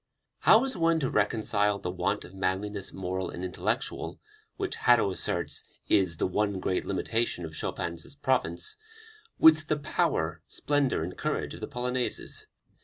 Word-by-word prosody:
How 220 +3 +6
is 270 -1 -1
one 165 -1 +3
to 130 - 0
reconcile 105 -1 +2
"the 90 -2 -4
want 95 +3 -1
of 90 - -13
manliness, 95 +1 -2
moral 95 0 -3
and 90 - -5
intellectual," 90 - -2 0.4
which - - -2
Hadow 120 -5 +4
asserts 85 -2 -1 0.3
is 90 -5 +3
"the - - +1
one 100 +1 0
great 95 0 -1
limitation 100 -2 -1
of 80 - -8
Chopin's 85 - -4
province," 145 - 0 0.6
with 155 -1 +7
the 155 - +1
power, 85 - 0
splendor 145 - +1
and 90 +2 -5
courage - - -2
of - - -9
the - - -3
Polonaises? 125 0 -2
100 Hz, 150 wpm, -29 LUFS, 90-130 Hz, 0.6 s, with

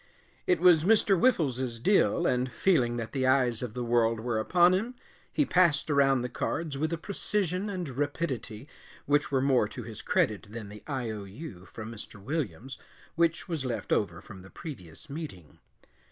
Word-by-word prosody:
It 180 -2 +3
was 170 -3 +6
Mr. 205 0 +4
Whiffles's 130 - +1
deal, 180 - +3
and 125 -2 +1
feeling 125 -11 +2
that 115 -1 -4
the 130 -1 0
eyes 125 -3 +3
of 120 -4 -5
the 125 - -2
world 115 -1 +2
were 115 -1 -1
upon 175 +9 +4
him, 225 +7 -1 0.4
he 295 - +2
passed 170 - +3
around 135 -3 +3
the - - -1
cards 155 +3 -3
with 155 +4 -1
a 170 - -1
precision 195 +1 -2
and 185 -4 -3
rapidity 135 -3 -3 0.4
which 145 0 +2
were 135 -1 +2
more 130 -6 +3
to 120 +3 -7
his 110 -1 -8
credit 105 0 0
than 110 -1 -7
the 105 0 -11
I. 130 -6 -2
O. 105 -2 -6
U. 100 - -10
from 110 0 -8
Mr. 105 -2 -9
Williams 130 - -4 0.3
which 170 +2 +1
was 165 -6 -2
left 125 -3 -4
over 85 -4 0
from 100 -3 -12
the 95 - -13
previous 95 - -10
meeting. 140 - -8
130 Hz, 180 wpm, -29 LUFS, 115-165 Hz, 0.4 s, was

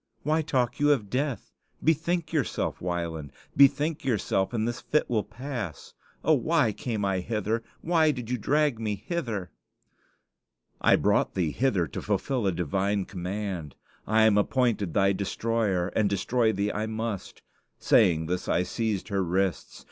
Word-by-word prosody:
Why 155 +2 +2
talk 130 -6 0
you 145 0 +4
of 105 -8 -4
death? 135 0 -2 0.3
Bethink 165 +1 +1
yourself, 150 -5 -1
Wieland; 85 -5 -3 0.2
bethink 145 +3 +4
yourself, 100 -5 0
and 115 -2 -1
this 120 0 -3
fit 150 - +1
will 110 -4 0
pass. 115 - -6 0.3
Oh, - - +4
why 110 - +2
came 105 -1 -3
I 95 -1 +1
hither? 110 +3 -1 0.2
Why 160 -2 +3
did 125 -6 -3
you 125 0 -2
drag 145 0 +1
me 105 -2 -1
hither?" 110 - -4 1.3
"I - - +5
brought - - +1
thee 85 -5 0
hither 105 - +1
to - - -6
fulfill 125 -7 -1
a - - +3
divine 95 +4 -1
command. 90 -4 -5 0.3
I 110 +1 +4
am 105 -2 +5
appointed 110 -5 0
thy 100 -1 +4
destroyer, 100 -2 -1
and 105 -1 +1
destroy 110 +4 +1
thee 100 0 -1
I 105 +1 -2
must." 110 -2 -5 0.3
Saying 80 -2 +3
this, 90 +2 -3
I 90 - +2
seized 105 +2 -2
her 100 -2 0
wrists. 95 +1 -1
110 Hz, 155 wpm, -27 LUFS, 95-125 Hz, 1.3 s, I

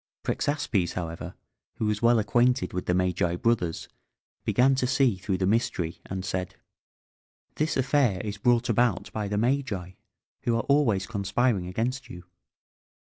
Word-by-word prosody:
Prexaspes, 130 - 0
however, 85 -2 -5 0.4
who 110 - -2
was 105 -1 0
well 120 0 +5
acquainted 120 +4 +2
with 90 - -4
the 90 - +2
Magi 90 -1 +1
brothers, 90 -5 0 0.6
began 130 +2 +3
to 130 -1 0
see 130 -4 +3
through 95 0 -2
the 95 - 0
mystery, 95 -5 0
and 95 0 -4
said: 95 0 -3 1.0
"This 155 +1 0
affair 130 -6 +2
is 105 -1 -5
brought 120 +2 +3
about 115 -4 +1
by 105 -2 -2
the 105 +1 -2
Magi, 115 -6 -1 0.5
who 120 - +1
are - - -1
always 125 -10 +2
conspiring 100 -1 0
against 120 +6 -3
you. 90 0 -9
105 Hz, 145 wpm, -27 LUFS, 95-125 Hz, 1.0 s, well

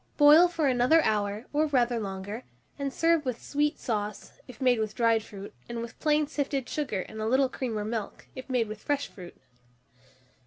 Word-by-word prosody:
Boil 300 +4 +8
for 330 -4 0
another 255 +5 +4
hour, 210 +1 0
or 305 +2 +2
rather 245 -4 +1
longer, 200 +3 -5 0.4
and 280 -1 -2
serve 330 +1 +2
with 255 -4 -3
sweet 295 +1 -1
sauce, 210 -3 -4
if 255 - -12
made 250 -3 +3
with 215 -1 -2
dried 230 -2 +3
fruit, 205 -2 -10 0.2
and 235 0 -4
with 235 - -10
plain 300 -1 +2
sifted 280 -3 -2
sugar 265 -11 -2
and 220 +3 -8
a 215 - -1
little 260 +3 +3
cream 250 -4 -3
or 210 - -3
milk, 220 -2 -5
if 260 0 -9
made 245 -3 +1
with 215 0 -8
fresh 285 -1 -1
fruit. 180 -3 -12
245 Hz, 190 wpm, -28 LUFS, 215-290 Hz, 0.4 s, Boil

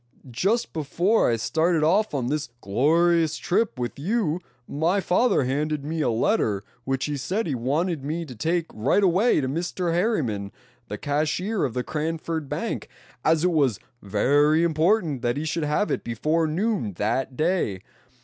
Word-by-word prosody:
"Just 200 - 0
before 175 +8 +1
I 115 - +2
started 160 +7 +1
off 185 +2 +2
on 130 -3 -1
this 145 +1 -2
glorious 160 - +2
trip 200 - 0
with 120 +2 -4
you 180 -1 0 0.3
my 165 +7 +1
father 195 - +2
handed 145 +3 -1
me 160 +1 -2
a 145 - +2
letter 110 - +1 0.2
which 135 0 -1
he 150 - -2
said 185 - -2
he 150 - -2
wanted 145 +6 -1
me 160 +4 -3
to 130 -5 -10
take 165 +8 0
right 130 - +2
away 190 +1 +3
to 130 - -1
Mr. 170 +4 -2
Harriman, 135 - 0 0.4
the 105 - -5
cashier 155 - -1
of 125 - -4
the 125 - -1
Cranford 160 0 -3
Bank, - - -3 0.3
as 160 0 +3
it 180 - +3
was 140 - +2 0.2
very 145 - +3
important 165 - +2
that 120 +3 0
he 150 - -2
should 160 0 -1
have 150 +8 0
it - - -1
before 155 +8 0
noon 180 - -1
that 125 +7 -2
day. 155 - 0
155 Hz, 165 wpm, -25 LUFS, 130-175 Hz, 0.4 s, away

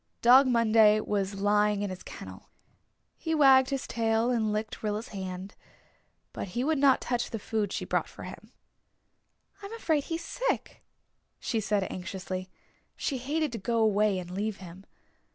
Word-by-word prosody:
Dog 260 +3 +7
Monday 220 -3 +5
was 195 -2 -2
lying 205 0 +2
in 200 - -3
his 185 - -7
kennel. - - -10 0.7
He 320 -1 -2
wagged 265 -3 +6
his 275 -2 -2
tail 225 +1 +1
and 220 -3 +1
licked 215 +1 -3
Rilla's 215 +1 -3
hand. 190 -1 -6 0.8
But - - -5
he 245 - +1
would 310 0 +1
not 275 -2 +4
touch 240 -1 -1
the 225 - -4
food 215 -2 -2
she - - -3
brought - - 0
for - - -11
him. - - -10 1.1
"I'm 400 +2 -8
afraid 315 -10 0
he's 330 0 -4
sick," - - -3 0.6
she 230 - -1
said 205 -1 0
anxiously. 185 0 -5 0.5
She 270 -3 -2
hated 300 +4 -1
to 230 - -5
go 230 +4 -1
away 210 -2 +3
and 180 -1 -6
leave 205 +2 -3
him. 185 +1 -12
220 Hz, 160 wpm, -28 LUFS, 200-260 Hz, 1.1 s, Dog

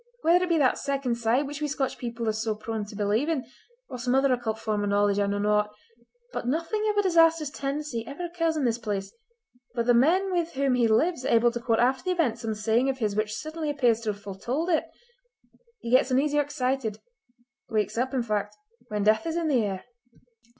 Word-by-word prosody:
Whether 350 +3 +4
it - - -7
be 335 - +3
that 270 -4 +3
'second 275 -3 -1
sight' 235 +5 +2
which 290 +1 -6
we 300 - 0
Scotch 280 -2 -2
people 235 -1 -4
are - - +3
so 220 0 -2
prone 215 0 -4
to 205 - -11
believe 210 +8 0
in, 295 -7 -1 0.4
or 250 - -7
some 250 +1 0
other 270 -1 +4
occult 230 -3 -2
form 215 -2 -2
of 205 - -1
knowledge, 205 0 +2
I 200 - +2
know 200 0 -1
not, 210 0 +1 0.6
but - - -4
nothing 335 - 0
of 415 - -1
a 410 - +4
disastrous 330 -4 +4
tendency 275 -4 -3
ever 300 +6 -5
occurs 330 -2 -1
in 290 - 0
this 235 -1 0
place 200 -4 -4 0.6
but 235 -1 0
the 245 - +5
men 350 +11 +3
with 345 -2 -1
whom 275 -1 +1
he 245 -2 +3
lives 260 +7 +2
are - - -1
able 235 +1 +4
to 240 - -4
quote 230 -2 +1
after 255 +2 +1
the 365 - +1
event 250 -9 0
some 225 -2 -3
saying 225 +5 +1
of 265 - -1
his 215 -5 -1
which 215 0 -1
certainly 310 0 -4
appears 245 -6 +2
to 220 - -2
have 205 - -9
foretold 235 - -3
it. 320 - +2 1.0
He 235 - -5
gets 255 +1 +5
uneasy 290 +3 +2
or - - +5
excited—wakes 250 - -4
up, 255 +3 0
in 250 - +1
fact—when 215 - -4
death 220 +10 +3
is 325 +1 -2
in 330 -2 0
the 250 -6 +3
air!" 195 -2 -4
250 Hz, 220 wpm, -27 LUFS, 220-300 Hz, 1.0 s, the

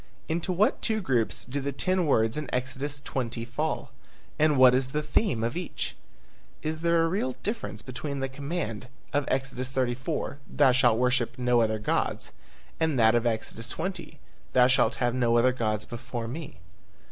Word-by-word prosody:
Into 165 +3 -1
what 195 +5 +2
two 220 -1 +1
groups 125 - 0
do 140 +3 -3
the 140 +1 -2
ten 185 +4 +1
words 115 -4 +3
in 150 -4 -4
Exodus 135 +3 -2
20 120 -4 -3
fall? 145 +2 -2 0.5
And 150 -2 +4
what 130 -1 +8
is 130 +1 0
the 150 0 0
theme 150 - +1
of 115 +1 -1
each? 180 0 -4 0.7
Is 155 0 -2
there 170 -1 +3
a - - +3
real 145 -8 -1
difference 200 - -3
between 140 +2 -5
the 135 - -1
command 135 -4 -4 0.3
of 145 0 +1
Exodus 130 -1 -2
34, 130 +3 -2
"Thou 140 -3 +4
shalt 125 -3 +4
worship 125 -1 +1
no 125 -1 +3
other 110 -1 +1
gods" 105 - -1 0.5
and 160 -4 +1
that 110 -1 +5
of 120 0 +2
Exodus 115 +1 -3
20, 185 +3 -5 0.3
"Thou 125 -1 +6
shall 125 -3 +4
have 120 -1 -1
no 120 -2 +3
other 125 +2 +4
gods 110 -3 -1
before 120 -1 -5
me"? 145 - -7
130 Hz, 170 wpm, -28 LUFS, 120-150 Hz, 0.7 s, what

